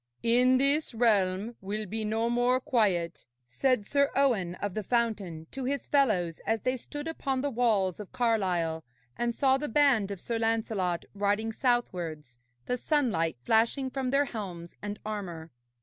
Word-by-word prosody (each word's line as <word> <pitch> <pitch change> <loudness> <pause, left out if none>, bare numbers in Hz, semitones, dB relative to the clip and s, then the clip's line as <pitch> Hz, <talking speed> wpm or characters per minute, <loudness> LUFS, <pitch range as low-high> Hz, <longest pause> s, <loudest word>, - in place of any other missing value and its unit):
'In 250 +2 +4
this 275 0 +2
realm 210 -1 +2
will 210 +2 -3
be 220 +3 -4
no 220 +2 0
more 245 +2 +2
quiet,' 190 -10 0 0.2
said 250 - +1
Sir 280 +4 +2
Owen 220 -11 +2
of 205 0 -4
the 215 - -2
Fountain 205 -8 -1
to 270 - -5
his 280 +2 -2
fellows 195 - +2
as 225 -1 +1
they 255 0 0
stood 290 +4 -7
upon 275 -5 -2
the 285 +1 -1
walls 215 -7 +1
of 210 - -8
Carlisle 180 -9 0 0.3
and 240 -1 -1
saw 270 -1 +3
the 295 - -3
band 250 -6 +3
of 200 -2 -5
Sir 230 +4 -3
Lancelot 220 -6 0
riding 205 +2 0
southwards, 175 - -2 0.3
the 250 - -1
sunlight 230 - +1
flashing 235 - +2
from 265 -1 -2
their 280 +2 +3
helms 180 -9 -7
and 205 0 -5
armour. 175 -7 -5
225 Hz, 160 wpm, -29 LUFS, 190-255 Hz, 0.3 s, In